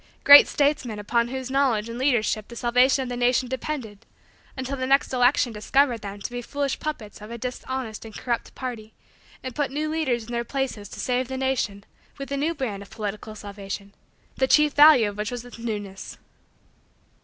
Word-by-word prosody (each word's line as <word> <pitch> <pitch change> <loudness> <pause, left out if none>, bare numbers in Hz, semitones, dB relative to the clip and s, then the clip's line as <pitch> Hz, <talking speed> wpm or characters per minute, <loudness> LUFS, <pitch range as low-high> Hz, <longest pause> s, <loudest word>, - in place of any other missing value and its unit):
Great 285 0 +10
statesmen 280 -6 0
upon 235 +3 0
whose 260 +1 -5
knowledge 260 -6 +2
and 230 +1 -6
leadership 235 -5 +1
the 235 - -11
salvation 250 +3 +3
of 255 - -6
the 245 - -3
nation 245 +1 +2
depended, 255 -5 -5 0.5
until 260 +1 -3
the 260 -1 -3
next 275 0 +3
election 250 0 +3
discovered 240 +2 +1
them 200 -1 -7
to 200 - -6
be 245 0 -4
foolish 280 +2 -3
puppets 220 -10 -6
of 210 - -9
a 235 - -6
dishonest 250 -1 -5
and 225 -2 -10
corrupt 235 -2 -3
party 230 -4 -6 0.5
and 255 - -5
put 290 +1 -1
new 300 +3 -2
leaders 300 -7 -1
in 240 - -10
their 235 0 -1
places 245 -6 -3
to - - -10
save 250 0 0
the 265 0 -5
nation 255 -7 -1 0.3
with 275 -1 -7
a 280 - -1
new 315 +4 0
brand 225 -9 -4
of 200 - -12
political 215 0 -6
salvation, 200 -1 -7 0.4
the 265 - +2
chief 300 +1 +4
value 290 -7 +7
of 205 - -9
which 210 +1 -2
was 245 -1 -6
its 245 -1 -12
newness? 205 -4 -6
245 Hz, 190 wpm, -25 LUFS, 215-270 Hz, 0.5 s, Great